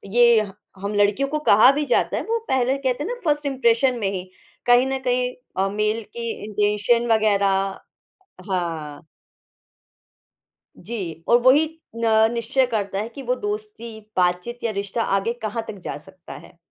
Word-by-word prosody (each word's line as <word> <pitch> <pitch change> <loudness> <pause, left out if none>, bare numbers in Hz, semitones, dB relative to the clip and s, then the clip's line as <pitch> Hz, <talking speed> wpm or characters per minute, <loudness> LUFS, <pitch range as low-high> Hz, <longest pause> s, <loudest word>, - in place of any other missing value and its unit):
ये 235 -2 +6
ह 200 -2 -6 0.3
हम 200 +1 -3
लड़कियों 205 +7 +2
को 305 - -1
कहा 215 +6 +7
भी 300 - -1
जाता 245 - +1
है, - - -1
वो 460 +1 -1
पहले 260 +1 +1
कहते 270 +1 -1
हैं - - -4
ना - - -2
फर्स्ट 295 -2 0
इंप्रेशन 255 -1 +2
में 200 -3 0
ही, 185 -2 -4 0.4
कहीं 245 +1 +5
न 265 0 -2
कहीं 250 0 +1 0.2
अ, 195 +1 +2
मेल 215 +2 -1
की 235 -1 -3 0.2
इंटेंशन 210 +3 +1
वग़ैरह 200 -3 +3 0.9
हाँ। 165 -5 -3 1.7
जी 175 -6 -6
और 240 - +6
वही 265 +6 +5 0.4
न 220 0 +4
निश्चय 245 +3 +1
करता 200 -4 -2
है 220 +3 -3
कि 275 - -10
वो 250 +1 0
दोस्ती, 415 - -6 0.2
बातचीत 180 +7 0
या 230 - 0
रिश्ता 200 +2 -3 0.2
आगे 230 +4 -1
कहाँ 220 +1 -3
तक 205 -3 -7
जा - - -4
सकता 165 +4 -13
है। 175 - -16
230 Hz, 165 wpm, -22 LUFS, 200-255 Hz, 1.7 s, कहा